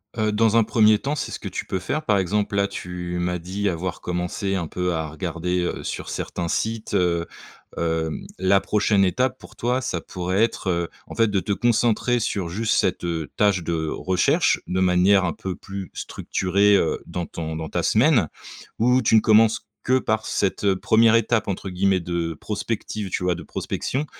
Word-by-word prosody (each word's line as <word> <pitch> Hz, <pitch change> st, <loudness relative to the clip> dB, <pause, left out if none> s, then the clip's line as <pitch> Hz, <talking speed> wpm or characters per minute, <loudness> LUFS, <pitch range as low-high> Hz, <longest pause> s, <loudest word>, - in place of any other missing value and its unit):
Heu, 110 Hz, -1 st, +1 dB
dans 110 Hz, +1 st, +2 dB
un 115 Hz, -, +6 dB
1er 110 Hz, -1 st, +4 dB
temps, 140 Hz, +5 st, -2 dB
c'est -, -, -4 dB
ce -, -, -5 dB
que -, -, -6 dB
tu -, -, -5 dB
peux 95 Hz, -, -2 dB
faire. 140 Hz, +12 st, -3 dB
Par 105 Hz, -, +3 dB
exemple, 100 Hz, +2 st, 0 dB
là, 100 Hz, 0 st, +2 dB
tu 90 Hz, -2 st, -5 dB
m'as 90 Hz, 0 st, -1 dB
dit 95 Hz, +4 st, -3 dB
avoir 90 Hz, +1 st, -4 dB
commencé 90 Hz, +3 st, -2 dB
un 85 Hz, -4 st, -2 dB
peu 90 Hz, +2 st, -2 dB
à 80 Hz, -1 st, -2 dB
regarder, 85 Hz, +3 st, -2 dB
heu, 90 Hz, -, -3 dB
sur -, -, -5 dB
certains 85 Hz, -, -3 dB
sites, 110 Hz, +5 st, -2 dB
heu, 85 Hz, -2 st, +1 dB, 0.5 s
hem, 80 Hz, -1 st, -2 dB
la 95 Hz, +1 st, +4 dB
prochaine 105 Hz, -1 st, +2 dB
étape 125 Hz, +7 st, +1 dB
pour -, -, -15 dB
toi, 125 Hz, +2 st, 0 dB
ça 105 Hz, -8 st, -2 dB
pourrait 90 Hz, +4 st, -2 dB
être, 115 Hz, -4 st, -1 dB
heu, 85 Hz, -1 st, 0 dB, 0.2 s
en -, -, -9 dB
fait, 115 Hz, -1 st, +3 dB
de 100 Hz, -2 st, +1 dB
te 105 Hz, -, -3 dB
concentrer 120 Hz, +2 st, +2 dB
sur 100 Hz, -5 st, -2 dB
juste 110 Hz, +6 st, 0 dB
cette, 90 Hz, -2 st, +1 dB
heu, 80 Hz, -4 st, -2 dB
tâche 100 Hz, -4 st, +2 dB
de 80 Hz, -1 st, -2 dB
recherche, 90 Hz, +2 st, +1 dB
de 95 Hz, -, -1 dB
manière 95 Hz, +1 st, +4 dB
un 85 Hz, -, -1 dB
peu 95 Hz, +3 st, -5 dB
plus 95 Hz, 0 st, -8 dB
structurée, 100 Hz, +2 st, +1 dB
heu, 80 Hz, -, 0 dB
dans 85 Hz, 0 st, -4 dB
ton 80 Hz, -1 st, -5 dB
dans 80 Hz, -1 st, -5 dB
ta -, -, -1 dB
semaine, 115 Hz, -, +3 dB, 0.5 s
où 125 Hz, +3 st, +4 dB
tu 110 Hz, -, +3 dB
ne -, -, +8 dB
commences 110 Hz, +1 st, +4 dB, 0.2 s
que 130 Hz, +1 st, +3 dB
par 110 Hz, -3 st, -1 dB
cette 100 Hz, 0 st, +1 dB
1re 110 Hz, +4 st, +4 dB
étape 115 Hz, -1 st, +2 dB
entre 95 Hz, 0 st, -3 dB
guillemets, 95 Hz, 0 st, +1 dB
de 85 Hz, -1 st, -2 dB
prospective, 105 Hz, +2 st, -4 dB
tu 90 Hz, -, -2 dB
vois, 90 Hz, -1 st, +1 dB
de 85 Hz, -, -8 dB
prospection, 135 Hz, -, -3 dB
95 Hz, 195 wpm, -23 LUFS, 90-110 Hz, 0.5 s, ne